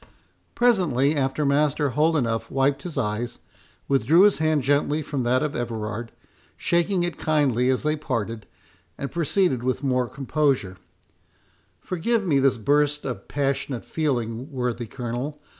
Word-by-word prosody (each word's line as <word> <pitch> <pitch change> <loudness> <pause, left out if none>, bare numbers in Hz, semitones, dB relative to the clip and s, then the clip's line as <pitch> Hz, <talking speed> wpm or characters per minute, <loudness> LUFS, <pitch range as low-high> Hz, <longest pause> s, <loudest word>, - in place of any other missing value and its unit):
Presently 165 - +3
after, 140 +1 0
Master 145 0 +2
Holdenough 140 -6 +1
wiped 135 +1 +1
his 170 -5 -7
eyes, 115 -1 -2 0.5
withdrew 140 +6 +4
his 205 -3 +5
hand 155 -3 +2
gently 145 +3 +1
from 140 -2 -3
that 125 +3 +2
of 150 -1 -2
Everard, 115 -1 -4 0.5
shaking 175 +1 +1
it 175 -1 -3
kindly 135 -5 +2
as 130 - +1
they 150 0 +1
parted, 115 -7 -4 0.5
and 140 - -5
proceeded 170 -4 +1
with 130 +2 -1
more 125 -3 +1
composure: 135 - 0 1.0
"Forgive 205 +5 -1
me 145 -6 +3
this 135 -2 +3
burst 145 +5 +1
of - - -5
passionate 135 -3 -2
feeling, 125 -3 -2
worthy 125 -3 -2
Colonel. 125 +5 -5
140 Hz, 135 wpm, -24 LUFS, 125-155 Hz, 1.0 s, his